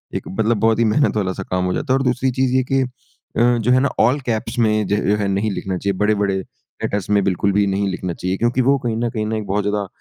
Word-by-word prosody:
एक -, -, -4 dB
मतलब 110 Hz, 0 st, +2 dB
बहुत 115 Hz, +1 st, +2 dB
ही 115 Hz, -, +3 dB
मेहनत 110 Hz, +6 st, +2 dB
वाला 95 Hz, -2 st, 0 dB
सा 95 Hz, -, -6 dB
काम 90 Hz, 0 st, 0 dB
हो 90 Hz, -, 0 dB
जाता 130 Hz, -, -1 dB
है। -, -, +4 dB
और -, -, -1 dB
दूसरी 125 Hz, +1 st, +1 dB
चीज़ 130 Hz, 0 st, 0 dB
ये 130 Hz, -, +4 dB
है 130 Hz, -, +2 dB
कि 135 Hz, 0 st, +3 dB
अ, 120 Hz, -1 st, -2 dB
जो 115 Hz, +2 st, +1 dB
है 130 Hz, -, +5 dB
ना 140 Hz, -, +2 dB
ऑल 135 Hz, +4 st, +3 dB
कैप्स 115 Hz, +1 st, -2 dB
में 110 Hz, -2 st, +2 dB
ज 105 Hz, +1 st, +1 dB
जो 105 Hz, -, +3 dB
है 105 Hz, -, -1 dB
नहीं 100 Hz, +2 st, 0 dB
लिखना 95 Hz, -1 st, -3 dB
चाहिए, 100 Hz, +1 st, -1 dB
बड़े-बड़े 105 Hz, -2 st, +1 dB, 0.5 s
लेटर्स 100 Hz, 0 st, -2 dB
में 100 Hz, -1 st, +3 dB
बिल्कुल 95 Hz, +1 st, +1 dB
भी 100 Hz, +1 st, +2 dB
नहीं 100 Hz, +1 st, 0 dB
लिखना 90 Hz, -1 st, -3 dB
चाहिए, 90 Hz, +3 st, -3 dB
क्योंकि 120 Hz, +2 st, +1 dB
वो 140 Hz, +3 st, +3 dB
कहीं 115 Hz, -2 st, -1 dB
न 120 Hz, 0 st, 0 dB
कहीं 110 Hz, -2 st, -3 dB
न 110 Hz, -, -2 dB
एक 110 Hz, -2 st, -2 dB
बहुत 100 Hz, +2 st, 0 dB
ज़्यादा 105 Hz, -1 st, -1 dB
105 Hz, 280 wpm, -20 LUFS, 100-120 Hz, 0.5 s, है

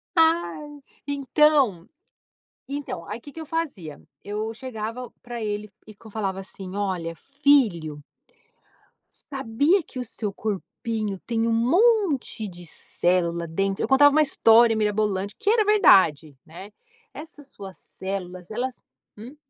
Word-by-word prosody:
Ai, 320 Hz, -3 st, +1 dB, 0.3 s
então 280 Hz, -, +2 dB, 0.8 s
então 275 Hz, -12 st, -5 dB
aí 210 Hz, +3 st, -5 dB
que 285 Hz, +4 st, -12 dB
que 325 Hz, -, -7 dB
eu -, -, -7 dB
fazia? 275 Hz, -, -4 dB, 0.2 s
Eu 215 Hz, +2 st, -4 dB
chegava 235 Hz, 0 st, -6 dB
para 240 Hz, -1 st, -7 dB
ele 210 Hz, 0 st, -3 dB, 0.2 s
e 215 Hz, -, -12 dB
que 205 Hz, -, -24 dB
eu -, -, -13 dB
falava 195 Hz, -3 st, -2 dB
assim: 190 Hz, 0 st, -8 dB
"Olha 180 Hz, -5 st, -2 dB
filho"... 225 Hz, -, +1 dB, 1.3 s
"sabia 280 Hz, -, +2 dB
que 285 Hz, -, -13 dB
o 250 Hz, -, -2 dB
seu 210 Hz, -3 st, -4 dB
corpinho 215 Hz, 0 st, -4 dB
tem 230 Hz, -1 st, 0 dB
um 230 Hz, -, +1 dB
monte 300 Hz, -, +2 dB
de 175 Hz, -1 st, -11 dB
célula 170 Hz, 0 st, -1 dB
dentro?". 195 Hz, +4 st, -1 dB
Eu -, -, 0 dB
contava 290 Hz, +3 st, +6 dB
uma 310 Hz, -, +5 dB
história 230 Hz, -5 st, +5 dB
mirabolante 210 Hz, -2 st, 0 dB
que 405 Hz, -, 0 dB
era 445 Hz, -1 st, +4 dB
verdade, 185 Hz, -, +4 dB
né. 180 Hz, +6 st, -11 dB, 0.4 s
Essas 295 Hz, -2 st, -11 dB
suas 195 Hz, -7 st, -10 dB
células 185 Hz, -1 st, -6 dB
elas, 250 Hz, +3 st, -3 dB, 0.4 s
hum? 240 Hz, +7 st, -10 dB
220 Hz, 135 wpm, -24 LUFS, 195-280 Hz, 1.3 s, contava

